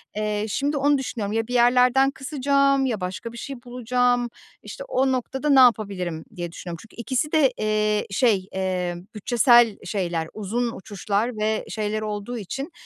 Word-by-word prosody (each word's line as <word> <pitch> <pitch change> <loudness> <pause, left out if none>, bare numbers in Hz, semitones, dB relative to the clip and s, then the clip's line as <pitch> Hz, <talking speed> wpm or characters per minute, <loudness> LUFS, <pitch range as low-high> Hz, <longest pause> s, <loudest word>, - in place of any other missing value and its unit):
Eee, 210 0 -1
şimdi 285 +6 -1
onu 285 +1 +3
düşünüyorum. 220 -6 -4
Ya 225 0 -1
bir 245 - -5
yerlerden 250 +2 +4
kısacağım 275 0 +1
ya 225 -6 -2
başka 185 +5 -5
bir 235 - -11
şey 275 +2 -6
bulacağım. 245 0 0 0.3
İşte, - - -8
o 265 - +1
noktada 265 +3 -2
ne 270 -2 +6
yapabilirim 195 -9 +2
diye 175 -2 -5
düşünüyorum. 170 0 -7
Çünkü 220 - -17
ikisi 260 +5 -1
de, 300 -5 +4
eee, 215 0 0
şey, 200 -4 +2
eee, 185 -2 -2 0.2
bütçesel 240 0 +4
şeyler, 170 -5 -2
uzun 230 +3 -2
uçuşlar 205 +4 -2
ve 215 +1 -1
şeyler 215 0 -2
olduğu 215 +3 -4
için, 270 - -5
230 Hz, 160 wpm, -24 LUFS, 205-260 Hz, 0.3 s, ne